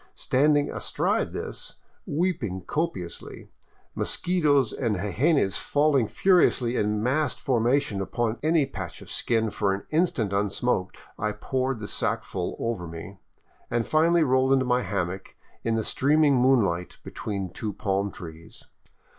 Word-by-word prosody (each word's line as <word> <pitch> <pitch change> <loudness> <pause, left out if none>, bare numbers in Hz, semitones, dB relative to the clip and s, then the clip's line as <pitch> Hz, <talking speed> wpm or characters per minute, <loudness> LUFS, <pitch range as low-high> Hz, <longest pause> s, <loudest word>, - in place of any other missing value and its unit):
Standing 145 +2 +2
astride - - 0
this, - - -5 0.3
weeping 145 - -1
copiously, 150 - -4 0.4
mosquitos 145 -9 +2
and 115 -5 -1
jejenes 105 - +1
falling 145 -5 +2
furiously 150 - +3
in 105 -1 0
massed 140 +3 0
formation 120 -4 +1
upon 115 +3 -2
any 155 -1 +3
patch 95 -10 -7
of - - -11
skin 115 -2 0
for 100 -2 0
an 100 - -8
instant 155 - +1
unsmoked, 100 0 0 0.2
I 105 0 -1
p>oured 130 +4 -2
the 105 - -6
sackful - - -2
over 105 -7 -3
me, 85 +4 -9 0.5
and 120 -1 0
finally 165 +2 +3
rolled 130 -1 +3
into 130 -1 +3
my 125 0 +2
hammock 95 -3 -3 0.3
in 115 -1 0
the 110 - 0
streaming 145 +3 +3
moonlight 115 -9 +2
between 100 -4 -5
two 110 - -4
palm 100 0 -1
trees. 80 -3 -11
120 Hz, 130 wpm, -26 LUFS, 100-145 Hz, 0.5 s, furiously